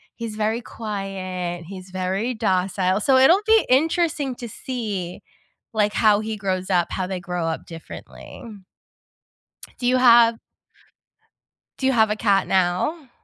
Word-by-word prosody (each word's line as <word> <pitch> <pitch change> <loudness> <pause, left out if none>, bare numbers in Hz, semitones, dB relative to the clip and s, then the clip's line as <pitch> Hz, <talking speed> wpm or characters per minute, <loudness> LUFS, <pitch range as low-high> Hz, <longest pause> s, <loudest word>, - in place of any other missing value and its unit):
he's 230 -2 -6
very 220 +2 -1
quiet, 185 -6 -5
he's 185 +1 -10
very 190 +6 -2
docile, 185 -2 0
so 265 +4 +4
it'll 330 +10 +6
be 445 0 +4
interesting 305 0 +1
to 240 -1 -8
see, 210 -8 -5 0.5
like, 210 -1 +1
how 215 -2 +3
he 220 0 -4
grows 185 -2 -3
up, 175 -2 +2
how 185 - -2
they 185 -1 -4
grow 175 -1 -4
up 165 0 -3
differently. 165 -1 -11 1.3
Do 245 - -2
you 255 +1 +3
have 235 -2 +6 1.4
do 265 - -2
you 265 - +4
have 220 -4 +3
a 210 - 0
cat 200 -3 +2
now? 190 - 0
210 Hz, 140 wpm, -22 LUFS, 185-245 Hz, 1.4 s, it'll